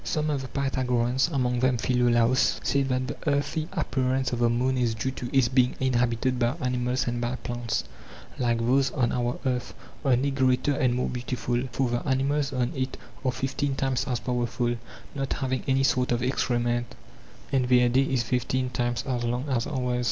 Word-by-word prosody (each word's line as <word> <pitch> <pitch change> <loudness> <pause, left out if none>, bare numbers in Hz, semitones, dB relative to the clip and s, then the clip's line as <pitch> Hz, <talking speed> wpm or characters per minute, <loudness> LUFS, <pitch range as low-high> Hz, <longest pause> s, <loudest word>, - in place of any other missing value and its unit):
Some 155 0 -1
of 140 -2 -1
the 130 - -6
Pythagoreans, 130 -2 +1
among 125 -4 0
them 130 0 +2
Philolaos, 120 +1 +2
said 140 -1 +1
that 130 0 0
the - - -5
earthy 145 +2 0
appearance 130 -6 0
of 120 - -1
the 120 -1 +3
moon 125 +3 +1
is 120 -3 +1
due 130 +4 -2
to 125 -2 -6
its 135 -3 +4
being 125 0 +2
inhabited 125 -1 +1
by 120 +3 +1
animals 125 -1 0
and 120 0 -1
by 120 +1 -1
plants, 120 -2 -3 0.6
like 120 -2 +2
those 130 +4 +2
on 125 -5 +1
our 120 0 -1
earth, 125 -1 -1 0.3
only 135 0 +2
greater 130 +1 +2
and 130 -2 +1
more 125 - 0
beautiful; 125 0 -2
for 130 +1 0
the 120 - 0
animals 140 +2 +1
on 125 -2 0
it 130 0 -2 0.3
are 130 - +2
fifteen 135 +2 -2
times 135 0 0
as 125 -3 -1
powerful, 120 -1 -1 0.4
not 135 -1 -2
having 130 -2 -1
any 135 0 +3
sort 125 -1 +2
of 120 0 +1
excrement, 120 -2 0 0.6
and 130 -2 +1
their 125 -1 +5
day 125 +2 +3
is 130 -3 +1
fifteen 125 +1 -1
times 120 -1 -1
as 125 -3 -2
long 120 +4 -1
as 125 -3 0
ours. 125 -4 -1
125 Hz, 185 wpm, -26 LUFS, 120-135 Hz, 0.6 s, their